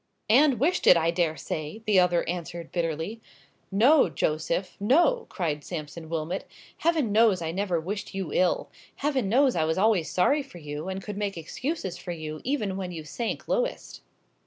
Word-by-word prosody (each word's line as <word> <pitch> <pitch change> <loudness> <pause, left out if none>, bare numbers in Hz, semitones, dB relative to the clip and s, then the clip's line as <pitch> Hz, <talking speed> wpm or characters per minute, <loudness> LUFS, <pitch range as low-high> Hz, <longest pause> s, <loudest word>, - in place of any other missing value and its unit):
"And 265 0 +5
wished 325 +8 +1
it, 175 - +9
I 165 0 +2
dare 165 -2 0
say!" 155 +9 -5
the 205 -3 +4
other 175 -1 +2
answered, 170 -1 -5
bitterly. 170 +6 -2 0.5
"No, 245 - +5
Joseph,—no!" 195 - +1
cried 155 -5 -2
Sampson 160 -1 -7
Wilmot; 165 +3 -3 0.3
"Heaven 320 -9 +1
knows 215 -3 +4
I 165 -1 -3
never 185 -1 0
wished 190 +4 -5
you 190 -6 -3
ill. 180 -1 +1 0.2
Heaven 270 -8 0
knows 260 +3 +4
I 160 - +2
was 160 +2 0
always 200 -5 +2
sorry 280 +12 +2
for 270 -10 -12
you, 150 +2 -6
and 190 0 -4
could 210 -2 -6
make 205 -3 -2
excuses 190 - -4
for 175 0 -5
you 155 -2 -6
even 215 -8 -1
when 185 -2 -4
you 165 -3 -6
sank 225 +9 -4
lowest!" - - -2
185 Hz, 170 wpm, -27 LUFS, 165-225 Hz, 0.5 s, it